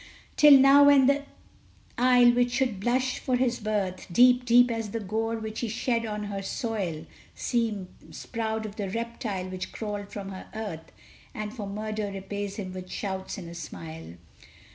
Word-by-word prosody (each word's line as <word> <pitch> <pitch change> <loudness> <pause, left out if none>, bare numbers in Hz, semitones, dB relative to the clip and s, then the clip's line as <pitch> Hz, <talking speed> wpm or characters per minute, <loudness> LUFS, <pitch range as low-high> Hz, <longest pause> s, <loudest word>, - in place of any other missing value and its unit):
Till 295 -2 +9
now, 275 +2 +7
when 285 -2 +6
the 280 +1 +2 0.7
isle 245 0 +5
which 245 0 +1
should 245 -6 0
blush 255 +4 0
for 255 - 0
his 245 -1 +1
birth, 205 -4 -2
Deep, 250 +5 +5
deep 245 0 +5
as 225 -2 -3
the 230 - -3
gore 220 +3 -2
which 220 0 -5
he 235 - -2
shed 230 +1 -1
on 210 -1 -4
her 200 -1 -4
soil, 195 -7 -3 0.3
Seems 220 -6 -3
proud 220 -2 -3
of 210 -1 -8
the 200 -3 -3
reptile 225 -3 -4
which 185 -1 -5
crawled 205 -2 -5
from 200 -1 -6
her 190 -1 -9
earth, 200 -8 -6 0.4
And 215 0 -5
for 210 -5 -6
murder 215 0 -4
repays 195 +1 -5
him 190 -4 -6
with 185 0 -8
shouts 190 -1 -4
and 180 -4 -8
a 170 - -9
smile! 165 - -8
215 Hz, 170 wpm, -27 LUFS, 195-240 Hz, 0.7 s, Till